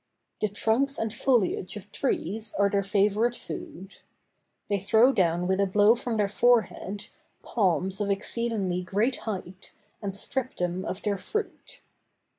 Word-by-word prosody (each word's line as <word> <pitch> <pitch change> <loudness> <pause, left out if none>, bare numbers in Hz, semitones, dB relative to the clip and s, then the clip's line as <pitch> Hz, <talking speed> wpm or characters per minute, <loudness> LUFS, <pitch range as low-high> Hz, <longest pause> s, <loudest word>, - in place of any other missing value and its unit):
The 215 - +2
trunks 230 +7 +1
and 225 -1 -2
foliage 225 -8 +1
of 205 0 -11
trees 215 -4 -1
are 200 0 +2
their 200 - +2
favorite 210 +4 +1
food. 190 -3 -8 0.7
They 200 -1 0
throw 225 +7 +4
down 175 -3 +1
with 190 +1 +1
a 200 - +3
blow 205 +3 +5
from 240 -1 -3
their 205 -1 +2
forehead, 210 -2 +1 0.4
palms 190 -1 0
of 205 - -1
exceedingly 200 -2 0
great 210 +8 0
height, 190 -2 -7 0.3
and 195 -2 -2
strip 255 +5 -1
them 180 +1 -2
of 185 - -5
their 200 -2 -1
fruit. 430 - -5
205 Hz, 145 wpm, -27 LUFS, 190-225 Hz, 0.7 s, blow